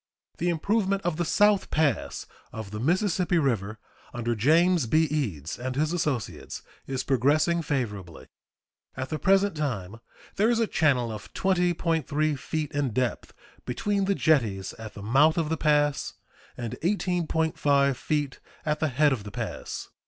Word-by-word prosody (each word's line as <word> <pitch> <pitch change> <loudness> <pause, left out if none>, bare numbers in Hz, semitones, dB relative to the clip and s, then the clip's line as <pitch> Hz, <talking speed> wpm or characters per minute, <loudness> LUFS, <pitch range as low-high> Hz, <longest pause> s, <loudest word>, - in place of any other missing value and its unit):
The 175 - +1
improvement 195 +3 0
of 170 -2 -1
the 175 - 0
South 205 +3 +3
Pass 155 -3 0 0.3
of 110 -3 -7
the 105 - -5
Mississippi 180 - +1
River, 110 - 0 0.4
under 120 0 -1
James 160 - +3
B. 155 +8 +4
Eads 115 - -2
and 130 +1 -3
his 155 +4 0
associates, 150 - -3 0.2
is 130 -1 -2
progressing 145 +6 +2
favorably. 105 - -4 0.7
At 130 0 -4
the 155 - -3
present 195 -1 +3
time 115 -9 -3 0.4
there 210 +3 +3
is 240 - +2
a 230 - +3
channel 135 - +1
of 105 -2 -8
20.3 165 -5 +1
feet 155 0 -3
in 140 -5 -1
depth 125 -1 -1 0.3
between 200 +11 -1
the 200 0 +1
jetties 115 - +1
at 110 -1 -8
the 100 - -8
mouth 145 - +4
of 160 -2 0
the 160 - +1
pass 145 -2 +1 0.4
and 120 -3 -5
18.5 160 -7 +1
feet 145 +1 -2 0.3
at 150 0 0
the 155 - +1
head 145 +1 +3
of 110 -6 -4
the 105 - -7
pass. - - -5
150 Hz, 150 wpm, -27 LUFS, 125-170 Hz, 0.7 s, B